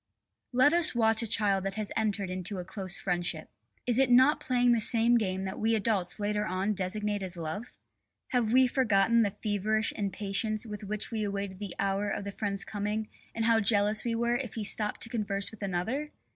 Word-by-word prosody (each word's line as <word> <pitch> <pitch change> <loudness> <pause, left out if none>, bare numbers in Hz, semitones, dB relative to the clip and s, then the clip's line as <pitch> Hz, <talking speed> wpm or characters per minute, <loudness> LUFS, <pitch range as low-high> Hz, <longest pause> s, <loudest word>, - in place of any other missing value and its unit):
Let 260 +4 +4
us 340 -6 +3
watch 225 -1 +3
a 230 - -2
child 200 -3 +2
that 195 0 -3
has 215 -2 -3
entered 205 -4 -1
into 185 +2 -3
a 180 - -5
close 190 -1 -4
friendship. 175 -2 -2 0.3
Is 245 0 +1
it 270 -2 +4
not 260 +5 +5
playing 245 -1 +2
the 235 -2 +3
same 230 +1 +3
game 190 -4 0
that 190 0 -5
we 225 +1 +2
adults 200 -4 0
later 210 0 -1
on 195 +1 -1
designate 205 +2 -2
as 185 -2 -5
love? 165 +8 -6 0.5
Have 240 -4 +1
we 260 +1 +6
forgotten 230 -3 +3
the 205 -2 -1
feverish 215 +1 0
impatience 205 +2 -1
with 210 -1 -7
which 210 +3 -4
we 220 -2 -2
awaited 200 -2 -4
the 205 -3 -6
hour 200 +1 0
of - - -3
the 200 - -5
friend's 200 -1 -1
coming 210 +1 -3 0.3
and 225 0 -1
how 230 -1 +4
jealous 210 0 +2
we 235 -1 -1
were 235 +1 +1
if 245 -4 -5
he 220 - -3
stopped 210 +1 0
to - - -1
converse 200 -4 0
with 220 - -14
another? 205 +11 -2
210 Hz, 200 wpm, -29 LUFS, 195-230 Hz, 0.5 s, we